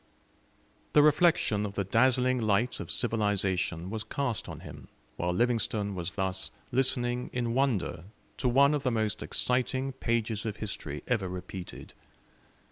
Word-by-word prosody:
The 150 - +7
reflection 150 - +4
of 100 -1 -4
the 100 - 0
dazzling 125 +4 +3
light 110 +3 +1
of - - -6
civilisation 100 -6 0
was 110 -1 -3
cast 125 0 -2
on - - -7
him - - -10 0.3
while 90 +1 -1
Livingstone 110 -1 0
was 90 -1 -3
thus 95 -1 -1 0.2
listening 125 -1 0
in 120 -2 -1
wonder 120 -10 0 0.3
to 125 - +1
one 140 +4 +5
of 145 - 0
the 130 - +1
most 110 -2 -1
exciting 130 +2 0
pages 115 -4 -1
of 110 -3 -3
history 80 -9 -4
ever 105 -7 0
repeated. 90 0 -7
115 Hz, 140 wpm, -29 LUFS, 100-125 Hz, 0.3 s, The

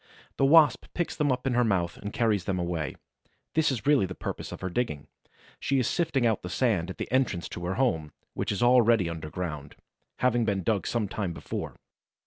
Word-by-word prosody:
The 135 - +3
Wasp 150 -3 +6
picks 175 - -1
them 150 -3 +1
up 125 0 -2
in 135 - +1
her 120 +1 +3
mouth 90 -6 0
and 105 - -6
carries 105 -6 +1
them 95 -2 -1
away. 85 -5 -2 0.6
This 160 -3 +3
is 115 -5 -4
really 140 -9 +4
the 90 - -7
purpose - - -5
of - - -8
her 95 - -2
digging. 75 - -2 0.5
She 135 - 0
is 130 - +2
sifting 140 -7 +1
out 110 -3 +2
the 90 - -6
sand 95 -6 +1
at 95 - -7
the - - -5
entrance 125 -9 +1
to 85 - -6
her 90 +2 -1
home, 80 - 0 0.2
which - - -2
is 100 +2 -1
all 125 +1 +6
ready 115 -5 +3
underground, 80 -2 -5 0.4
having 120 -2 +2
been 100 -4 0
dug 100 -3 0
some 115 -4 0
time 95 -3 -3
before. - - -5
105 Hz, 210 wpm, -28 LUFS, 90-125 Hz, 0.6 s, Wasp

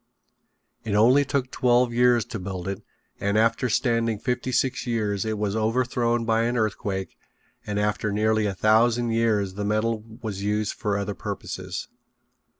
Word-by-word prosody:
It 110 -3 -2
only 125 +7 +5
took 135 -2 -2
twelve 125 -1 +2
years 120 -1 +4
to 115 - -6
build 95 -1 -5
it 100 0 -4 0.4
and 100 +1 0
after 115 +3 +2
standing 115 -2 +1
fifty 125 +3 -2
six 130 +1 0
years 105 -4 -1
it 110 -1 -2
was 105 0 -1
overthrown 120 +1 0
by 115 0 +2
an 120 +1 0
earthquake 100 -4 -2 0.5
and 105 -1 -2
after 105 0 0
nearly 110 +1 +1
a 100 - -3
thousand 115 +3 +3
years 110 -4 +1
the 105 +2 -4
metal 110 +1 0 0.2
was 100 -3 -4
used 105 +1 -1
for 105 -2 -2
other 100 0 -2
purposes. - - -5
110 Hz, 155 wpm, -25 LUFS, 105-120 Hz, 0.5 s, only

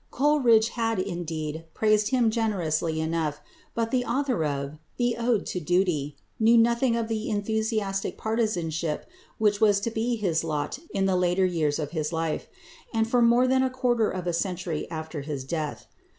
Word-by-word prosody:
Coleridge 250 -6 +4
had, 225 -2 -1
indeed, 165 -4 -3
praised 215 -1 +3
him 245 -4 +3
generously 170 -8 0
enough, 160 -2 -1 0.4
but 230 -1 -1
the 255 -1 +2
author 250 - 0
of 140 0 -3 0.2
"The 240 -1 +1
Ode 235 -2 +1
to 180 - -3
Duty" 170 -4 0 0.2
knew 230 +1 +5
nothing 235 +1 +3
of 230 -1 -1
the 220 -1 -2
enthusiastic 215 -1 -1
partisanship 175 -9 -1 0.3
which 210 -1 +2
was 205 -2 +5
to 230 - -2
be 230 +2 0
his 180 -8 0
lot 155 - -2
in 195 -1 0
the 190 -1 +2
later 180 +1 +2
years 160 -5 0
of 150 -3 -4
his 155 -2 -2
life, 165 -1 -2 0.4
and 225 -1 +1
for 245 +1 +2
more 240 +2 +5
than 260 0 +3
a 260 - +2
quarter 245 -3 +1
of 185 -1 -4
a 175 - 0
century 175 -2 -2
after 160 -2 -5
his 140 -2 -4
death. 150 +1 -4
200 Hz, 170 wpm, -26 LUFS, 160-230 Hz, 0.4 s, knew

